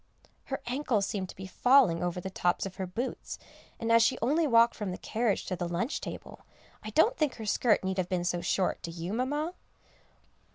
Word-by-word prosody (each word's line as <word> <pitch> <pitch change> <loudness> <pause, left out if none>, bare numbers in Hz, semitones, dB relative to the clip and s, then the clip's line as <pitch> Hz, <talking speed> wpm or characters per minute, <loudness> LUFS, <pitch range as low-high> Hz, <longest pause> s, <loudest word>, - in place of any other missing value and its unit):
Her 270 - -4
ankles 245 -5 0
seemed 190 -2 -3
to - - -9
be 190 - -8
falling 245 -3 +4
over 175 0 -2
the 190 +1 -6
tops 180 0 0
of 190 -1 -7
her 190 -2 -3
boots, 235 +8 -4 0.4
and 230 0 -1
as 230 0 +6
she 230 - +3
only 300 +7 +2
walked 235 -2 +5
from 210 -3 -4
the 180 - -4
carriage 225 -2 -1
to 185 - -2
the 175 0 -3
lunch 175 - -2
table, - - -8 0.4
I 215 - -7
don't 325 - +3
think 305 - 0
her 220 - -7
skirt 215 +1 +2
need 190 0 -1
have 180 - -1
been 180 -2 0
so 175 0 0
short; 185 +1 0
do 170 - -6
you, 170 +3 -5
Mamma? 290 +8 -1
210 Hz, 210 wpm, -29 LUFS, 185-250 Hz, 0.4 s, as